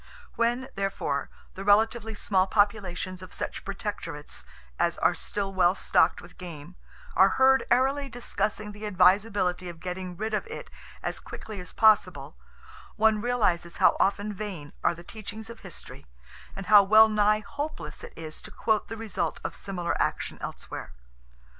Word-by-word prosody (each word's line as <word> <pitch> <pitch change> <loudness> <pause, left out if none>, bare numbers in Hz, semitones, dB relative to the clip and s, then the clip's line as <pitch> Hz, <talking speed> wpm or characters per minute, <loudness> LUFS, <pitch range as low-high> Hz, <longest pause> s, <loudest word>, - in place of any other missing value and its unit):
When, 240 +3 0
therefore, 190 -8 -2 0.2
the 195 - -7
relatively 220 +2 +3
small 190 -2 +2
populations 190 -3 0
of 185 - -10
such - - -4
protectorates 195 -7 -5 0.4
as - - +1
are - - +3
still 200 -1 -3
well 185 0 +4
stocked 170 - +2
with 175 - -15
game 170 -1 -9 0.4
are 190 0 +5
heard 265 0 +5
airily 270 +3 +2
discussing 215 -3 -2
the 210 +1 -6
advisability 185 -1 +3
of 170 -1 -9
getting 180 0 -5
rid 220 +1 -3
of 215 - -1
it - - -8 0.3
as - - -3
quickly 215 -3 -8
as 180 -1 -7
possible, 220 -2 +3 0.6
one 220 -1 +3
realizes 205 -8 0
how - - +5
often 200 +2 +1
vain 190 -8 -6
are - - +3
the 170 - -12
teachings 220 +3 -7
of 230 - -11
history, 140 - -10 0.5
and 195 - -6
how 205 +2 +8
well 215 +3 +7
nigh 215 0 +3
hopeless 290 +7 -6
it - - -9
is 155 -1 -7
to - - -9
quote 220 -2 0
the 225 - -6
result 190 -7 -2
of - - -4
similar 175 -3 -3
action - - -1
elsewhere. - - -7
205 Hz, 155 wpm, -27 LUFS, 180-220 Hz, 0.6 s, how